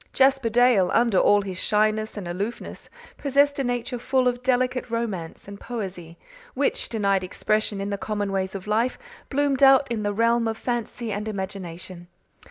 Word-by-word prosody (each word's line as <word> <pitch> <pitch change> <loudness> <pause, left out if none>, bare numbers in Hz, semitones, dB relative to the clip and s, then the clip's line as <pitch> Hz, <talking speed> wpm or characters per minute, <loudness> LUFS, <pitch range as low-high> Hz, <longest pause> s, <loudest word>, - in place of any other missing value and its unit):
Jasper 265 -2 +3
Dale, 235 -5 +4
under 230 -5 +3
all 205 0 +4
his 185 -2 -6
shyness 215 +1 +1
and 195 -4 -5
aloofness, 200 +7 -5 0.3
possessed 285 0 +2
a - - +1
nature 245 0 -2
full 260 +1 +1
of 245 0 0
delicate 255 0 0
romance 210 -10 -4
and 200 0 -9
poesy, 185 -8 -6 0.4
which, 275 +1 0
denied 200 -4 +1
expression 210 +2 -1
in 200 +1 -3
the 200 - -3
common 205 -2 -2
ways 190 0 -2
of 190 - -6
life, 225 +4 0 0.3
bloomed 280 -1 0
out 270 0 +7
in 225 -2 -1
the 205 0 -1
realm 230 +2 +2
of 220 0 -2
fancy 240 -1 -3
and 205 +2 -3
imagination. 185 -3 -6
220 Hz, 170 wpm, -24 LUFS, 195-245 Hz, 0.4 s, out